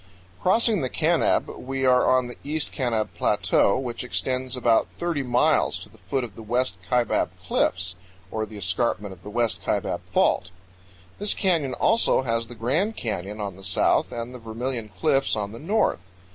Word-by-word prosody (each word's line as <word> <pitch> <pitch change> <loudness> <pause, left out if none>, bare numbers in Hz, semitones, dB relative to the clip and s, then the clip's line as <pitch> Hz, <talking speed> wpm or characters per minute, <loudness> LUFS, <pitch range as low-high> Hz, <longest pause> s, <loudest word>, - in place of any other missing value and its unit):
Crossing 220 0 +3
the 130 - -1
Kanab, 165 +4 +2
we 135 +1 -2
are 125 -1 +4
on 130 -1 +3
the 120 - -7
East 150 +1 0
Kanab 115 -4 0
Plateau, 100 - +2
which 125 -2 -4
extends 130 +1 -1
about 115 -2 +3
30 170 -4 -1
miles 125 -2 +2
to - - -10
the - - -20
foot 135 -2 -2
of 115 -4 -7
the 115 - -10
West 120 -3 0
Kaibab 125 -2 +2
Cliffs, 95 -1 0 0.4
or 110 0 -2
the 105 0 -10
escarpment 100 +1 -1
of 90 - -16
the 105 - -9
West 115 +1 0
Kaibab - - -1
Fault. 90 - +2 0.7
This 205 0 +2
canyon 165 -9 +1
also 225 - +3
has 115 -2 -1
the 120 - -9
Grand 155 - 0
Canyon 105 -2 -4
on 100 -3 -4
the 95 - -13
south 95 - +2
and 120 +1 -5
the 125 - -8
Vermilion 115 0 -4
Cliffs 135 +5 +1
on 105 -2 -3
the 115 - -9
north. 205 - +1
125 Hz, 175 wpm, -25 LUFS, 110-135 Hz, 0.7 s, are